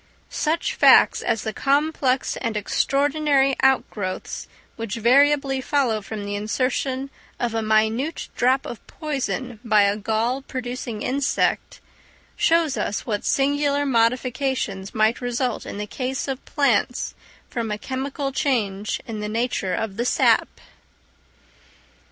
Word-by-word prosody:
Such 325 Hz, +3 st, 0 dB
facts -, -, +6 dB
as 225 Hz, -3 st, -1 dB
the 220 Hz, -, -3 dB
complex 275 Hz, -1 st, +1 dB
and 230 Hz, -4 st, -2 dB
extraordinary 275 Hz, +4 st, +2 dB
out 265 Hz, -1 st, +3 dB
growths 185 Hz, -3 st, -5 dB, 0.3 s
which 230 Hz, -1 st, -4 dB
variably 270 Hz, +3 st, +3 dB
follow 255 Hz, -6 st, +1 dB
from 205 Hz, 0 st, -6 dB
the 205 Hz, -, -4 dB
insertion 255 Hz, +5 st, -1 dB, 0.3 s
of 240 Hz, -2 st, -1 dB
a 225 Hz, -, 0 dB
minute 220 Hz, +7 st, +1 dB
drop 255 Hz, +2 st, +2 dB
of 235 Hz, -, -7 dB
poison 270 Hz, -6 st, -4 dB
by 215 Hz, -3 st, +4 dB
a 200 Hz, 0 st, +2 dB
gall 225 Hz, +5 st, -1 dB
producing 245 Hz, -4 st, -5 dB
insect, 275 Hz, +2 st, 0 dB, 0.5 s
shows 325 Hz, -4 st, +2 dB
us 205 Hz, -, -2 dB
what 210 Hz, -3 st, -2 dB
singular 285 Hz, +1 st, +1 dB
modifications 245 Hz, -4 st, 0 dB
might 220 Hz, +3 st, +2 dB
result 245 Hz, -1 st, -2 dB
in -, -, -6 dB
the 210 Hz, -, -3 dB
case 260 Hz, +5 st, -3 dB
of 270 Hz, -1 st, -4 dB
plants 250 Hz, -4 st, +1 dB, 0.3 s
from 230 Hz, -2 st, -3 dB
a 210 Hz, -, -2 dB
chemical 270 Hz, +4 st, -3 dB
change 215 Hz, -8 st, -1 dB
in 220 Hz, -2 st, -5 dB
the 210 Hz, 0 st, -3 dB
nature 220 Hz, -5 st, -1 dB
of 210 Hz, -3 st, -3 dB
the 240 Hz, -, -1 dB
sap. -, -, +3 dB
250 Hz, 130 wpm, -23 LUFS, 220-275 Hz, 0.5 s, facts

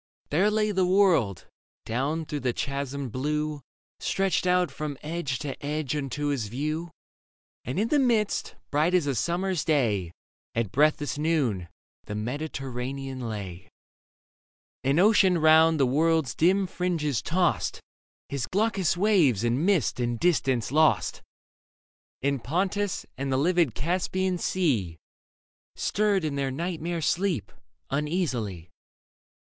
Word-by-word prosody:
There 185 Hz, +8 st, +3 dB
lay 215 Hz, 0 st, +1 dB
the 190 Hz, -2 st, +1 dB
world, 180 Hz, -, +3 dB, 0.4 s
down 140 Hz, +8 st, -1 dB
through 150 Hz, -1 st, -4 dB
the 125 Hz, -3 st, -1 dB
chasmed 140 Hz, -2 st, -3 dB
blue, 150 Hz, +3 st, -2 dB, 0.4 s
Stretched 195 Hz, -1 st, 0 dB
out 180 Hz, -3 st, +2 dB
from 145 Hz, 0 st, -5 dB
edge 150 Hz, -4 st, -2 dB
to 140 Hz, -1 st, -6 dB
edge 150 Hz, -1 st, -2 dB
unto 145 Hz, +1 st, -2 dB
his 130 Hz, -7 st, -1 dB
view; 155 Hz, +8 st, -3 dB, 0.8 s
And 125 Hz, +9 st, -2 dB
in 220 Hz, +2 st, +1 dB
the 295 Hz, -, +3 dB
midst, 230 Hz, -6 st, +1 dB, 0.2 s
bright 155 Hz, +5 st, +2 dB
as 175 Hz, -5 st, +3 dB
a 140 Hz, -, 0 dB
summer's 175 Hz, -, -1 dB
day 115 Hz, -, +1 dB, 0.4 s
At 115 Hz, -4 st, -1 dB
breathless 150 Hz, +1 st, +2 dB
noon, 135 Hz, -, 0 dB, 0.4 s
the 105 Hz, -, -5 dB
Mediterranean 135 Hz, +1 st, -4 dB
lay; 95 Hz, -4 st, -7 dB, 1.1 s
And 140 Hz, +4 st, +2 dB
Ocean 190 Hz, -2 st, +5 dB
round 160 Hz, 0 st, +5 dB
the 135 Hz, -, +5 dB
world's 155 Hz, 0 st, +2 dB
dim 190 Hz, +4 st, +3 dB
fringes 165 Hz, -, -1 dB
tossed 175 Hz, -, 0 dB, 0.5 s
His 140 Hz, -3 st, -3 dB
glaucous 195 Hz, -4 st, +1 dB
waves 175 Hz, -, +3 dB
in 120 Hz, +5 st, +1 dB
mist 180 Hz, -, +2 dB
and 120 Hz, -1 st, -1 dB
distance 130 Hz, -, +1 dB
lost; 155 Hz, +2 st, +2 dB, 1.0 s
And 140 Hz, -3 st, 0 dB
Pontus 190 Hz, +6 st, -1 dB
and 135 Hz, 0 st, -2 dB
the 130 Hz, -, +2 dB
livid 170 Hz, -, +2 dB
Caspian 180 Hz, +3 st, -1 dB
Sea 120 Hz, -, 0 dB, 0.8 s
Stirred 200 Hz, -4 st, +1 dB
in 145 Hz, -2 st, -2 dB
their 135 Hz, -1 st, 0 dB
nightmare 170 Hz, +3 st, -3 dB
sleep 175 Hz, -, 0 dB, 0.4 s
uneasily. 130 Hz, -, -2 dB
150 Hz, 125 wpm, -27 LUFS, 130-180 Hz, 1.1 s, Ocean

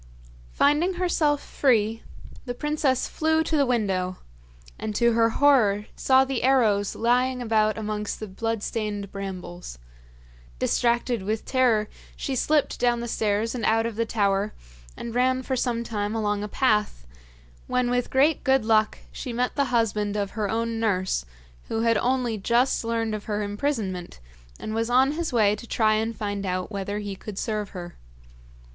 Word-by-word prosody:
Finding 300 Hz, -, +2 dB
herself 320 Hz, -5 st, +1 dB
free, 225 Hz, -4 st, +1 dB, 0.4 s
the 245 Hz, -1 st, -4 dB
princess 295 Hz, -2 st, 0 dB
flew 320 Hz, 0 st, +1 dB
to 320 Hz, -, -1 dB
the 280 Hz, -3 st, +3 dB
window, 190 Hz, -6 st, 0 dB, 0.6 s
and 215 Hz, -1 st, -4 dB
to 235 Hz, +1 st, +3 dB
her 230 Hz, 0 st, +3 dB
horror 225 Hz, -6 st, +3 dB
saw 265 Hz, 0 st, +4 dB
the 265 Hz, -2 st, -2 dB
arrows 225 Hz, -6 st, +2 dB
lying 250 Hz, +2 st, +1 dB
about 220 Hz, -2 st, +1 dB
amongst 210 Hz, -1 st, -3 dB
the 215 Hz, -, -4 dB
bloodstained 210 Hz, -1 st, -3 dB
brambles. 185 Hz, -, -7 dB, 0.8 s
Distracted 235 Hz, -, +1 dB
with 215 Hz, +3 st, -3 dB
terror 240 Hz, -5 st, +2 dB, 0.3 s
she 270 Hz, -, -3 dB
slipped 295 Hz, +3 st, +1 dB
down 240 Hz, -1 st, +2 dB
the 235 Hz, -, -4 dB
stairs 220 Hz, 0 st, 0 dB
and 245 Hz, -3 st, -4 dB
out 225 Hz, +1 st, +2 dB
of 230 Hz, -2 st, -3 dB
the 230 Hz, +1 st, -1 dB
tower, 200 Hz, -1 st, 0 dB, 0.4 s
and 235 Hz, -, -6 dB
ran 255 Hz, +1 st, +2 dB
for 260 Hz, -, -1 dB
some 240 Hz, -2 st, -1 dB
time 210 Hz, -1 st, -3 dB
along 210 Hz, -2 st, 0 dB
a 210 Hz, -, -3 dB
path, 210 Hz, -, 0 dB, 0.6 s
when 250 Hz, -1 st, +1 dB
with 245 Hz, 0 st, 0 dB
great 285 Hz, +4 st, +3 dB
good 265 Hz, -4 st, +3 dB
luck 220 Hz, -1 st, +3 dB
she 250 Hz, -, -6 dB
met 245 Hz, +2 st, -1 dB
the 280 Hz, -, +2 dB
husband 210 Hz, -4 st, 0 dB
of 200 Hz, -1 st, -2 dB
her 210 Hz, -2 st, -2 dB
own 230 Hz, 0 st, -1 dB
nurse, 185 Hz, -, 0 dB, 0.4 s
who 225 Hz, -, -1 dB
had 230 Hz, -1 st, +3 dB
only 245 Hz, -3 st, 0 dB
just 235 Hz, +6 st, +2 dB
learned 230 Hz, -1 st, -1 dB
of 210 Hz, -1 st, -5 dB
her 210 Hz, -1 st, -2 dB
imprisonment, 205 Hz, -, -3 dB, 0.4 s
and 215 Hz, -, -5 dB
was 225 Hz, +1 st, -1 dB
on 260 Hz, +3 st, +4 dB
his 325 Hz, +1 st, -3 dB
way 210 Hz, -4 st, +3 dB
to 235 Hz, -, -11 dB
try 215 Hz, -2 st, +2 dB
and 225 Hz, +1 st, -1 dB
find 205 Hz, -2 st, -3 dB
out 185 Hz, +1 st, -2 dB
whether 200 Hz, 0 st, -3 dB
he 205 Hz, -2 st, -4 dB
could 200 Hz, +1 st, -9 dB
serve 210 Hz, -2 st, -2 dB
her. 175 Hz, -2 st, -9 dB
225 Hz, 165 wpm, -25 LUFS, 210-250 Hz, 0.8 s, saw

